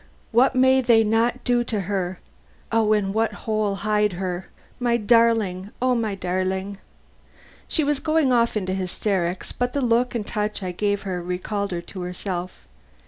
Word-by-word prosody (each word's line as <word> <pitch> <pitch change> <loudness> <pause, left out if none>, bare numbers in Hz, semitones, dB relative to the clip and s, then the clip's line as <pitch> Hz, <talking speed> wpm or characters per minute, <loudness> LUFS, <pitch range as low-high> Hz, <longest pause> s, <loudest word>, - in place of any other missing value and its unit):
What 245 +4 +4
may 260 +1 +5
they 235 -3 +5
not 225 +2 +1
do 245 -1 +2
to 215 -4 -2
her! 185 -2 -2 0.5
In 215 -3 +2
what 225 +1 +1
hole 215 -2 0
hide 210 0 +1
her! 180 0 -4 0.3
My 240 -1 +2
darling, 220 -4 +2
O 255 0 +2
my 220 -4 -1
darling!" 190 +1 -2 0.9
She 315 - +1
was 290 -1 +1
going 310 -3 +2
off 235 -2 +2
into 185 -2 -2
hysterics, 185 -1 -2
but 245 0 -2
the 280 - 0
look 240 +1 +2
and 220 -3 -2
touch 210 -2 -2
I 185 - -2
gave 205 +2 -1
her 185 -3 -3
recalled 185 +3 -3
her 175 -2 -3
to 185 +2 -9
herself. 180 - -5
210 Hz, 160 wpm, -23 LUFS, 185-235 Hz, 0.9 s, may